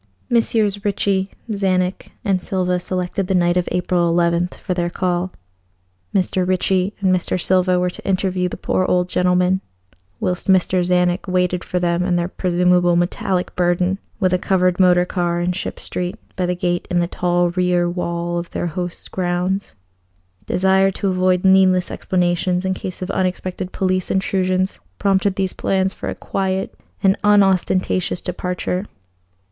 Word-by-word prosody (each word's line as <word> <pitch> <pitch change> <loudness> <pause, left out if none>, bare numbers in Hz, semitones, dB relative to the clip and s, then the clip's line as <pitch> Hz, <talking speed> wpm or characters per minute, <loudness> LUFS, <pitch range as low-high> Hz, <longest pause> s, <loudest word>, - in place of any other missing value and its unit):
Messrs. 215 -3 +1
Ricci, 200 -2 0 0.2
Czanek, 190 -3 0 0.2
and 190 -3 +1
Silva 180 -2 0
selected 180 +1 -3
the 190 - +1
night 175 -1 +3
of 180 -1 0
April 175 -1 +1
11th 170 +1 +1
for 180 - -3
their 175 -1 -1
call. 180 0 -1 0.8
Mr. 185 0 +1
Ricci 185 +1 +1
and 185 -1 +3
Mr. 185 0 -1
Silva 185 0 +2
were 180 0 0
to - - -11
interview 185 -1 0
the - - -6
poor 185 - 0
old 180 -1 +1
gentleman, 180 +1 +2 0.6
whilst 180 0 -2
Mr. 185 -1 +3
Czanek 180 +1 +1
waited 180 -1 0
for 180 - -3
them 175 -1 +1
and 180 -1 +1
their 170 0 0
presumable 180 -1 +2
metallic 180 +1 -1
burden 180 +2 +1 0.2
with 185 -3 +2
a 180 - +2
covered 185 -1 +1
motor 180 -1 +5
car 175 -1 -1
in 175 +1 0
Ship 180 - -5
Street, 180 +3 -3 0.2
by 180 -1 -1
the 180 - 0
gate 175 0 -1
in 175 - +1
the 175 - +2
tall 175 0 0
rear 180 -1 +1
wall 175 -1 -2
of 170 - -7
their - - -3
host's 175 +1 -4
grounds. 180 - -2 0.7
Desire 190 +1 +3
to 195 +1 -2
avoid 185 0 +1
needless 190 -1 +4
explanations 180 0 0
in 190 - +1
case 185 0 -6
of 185 - -3
unexpected 185 0 -2
police 185 -1 -1
intrusions 185 0 0 0.2
prompted 195 -1 +1
these 190 -1 0
plans 190 0 0
for - - -5
a - - -4
quiet 190 0 -2 0.3
and 195 0 +5
unostentatious 190 -3 +2
departure. 180 +1 -3
180 Hz, 155 wpm, -20 LUFS, 180-190 Hz, 0.8 s, motor